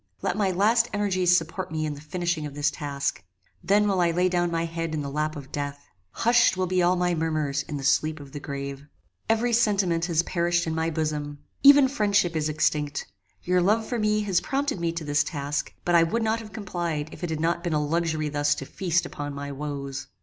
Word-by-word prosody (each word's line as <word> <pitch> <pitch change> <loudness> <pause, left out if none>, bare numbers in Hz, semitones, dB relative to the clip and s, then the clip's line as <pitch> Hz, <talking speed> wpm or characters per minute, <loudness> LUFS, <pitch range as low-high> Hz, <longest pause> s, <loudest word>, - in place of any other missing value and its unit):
Let - - 0
my 200 -2 +1
last 220 +6 +3
energies 185 -4 +3
support 165 -1 -4
me 155 -1 -1
in 150 - -2
the 145 - -10
finishing 170 -1 -2
of 140 - -10
this 145 0 +1
task. 140 -7 -3 0.4
Then 205 +3 +3
will 190 -3 +2
I 170 - +3
lay 180 +2 +2
down 175 -1 +1
my 165 0 -1
head 165 -1 -3
in 150 - -2
the 140 - -5
lap 155 +1 -1
of 140 -2 -9
death. 145 0 -4 0.2
Hushed 235 - +3
will 185 - +1
be 185 0 +1
all 175 +1 +3
my 180 0 +1
murmurs 155 -4 -1
in 150 - -3
the 140 - -6
sleep 155 +3 +2
of 140 -1 -11
the 145 - -6
grave. 140 0 -6 0.4
Every 230 +2 +2
sentiment 195 -7 +2
has 170 -2 +1
perished 175 0 0
in 160 - -2
my 160 0 0
bosom. 150 -2 -2 0.2
Even 280 -1 +8
friendship 205 -9 +1
is 155 -1 0
extinct. 150 -1 0 0.4
Your 180 0 +2
love 215 +5 +2
for 240 0 -3
me 215 0 +2
has 195 -4 +1
prompted 280 -5 -1
me 170 -1 0
to 165 -1 -5
this 145 0 +2
task; 145 -1 -3
but 175 - +1
I 170 - +7
would 220 +8 +1
not 220 +1 +1
have 220 -2 -10
complied 175 -7 -3
if - - -11
it 175 - -1
had 160 -1 -2
not 170 +1 0
been 175 -3 -1
a 150 -1 +1
luxury 160 -1 0
thus 145 0 +1
to 135 - -6
feast 175 +2 0
upon 145 -1 -6
my 140 0 -5
woes. 140 -2 -5
165 Hz, 225 wpm, -26 LUFS, 150-185 Hz, 0.4 s, Even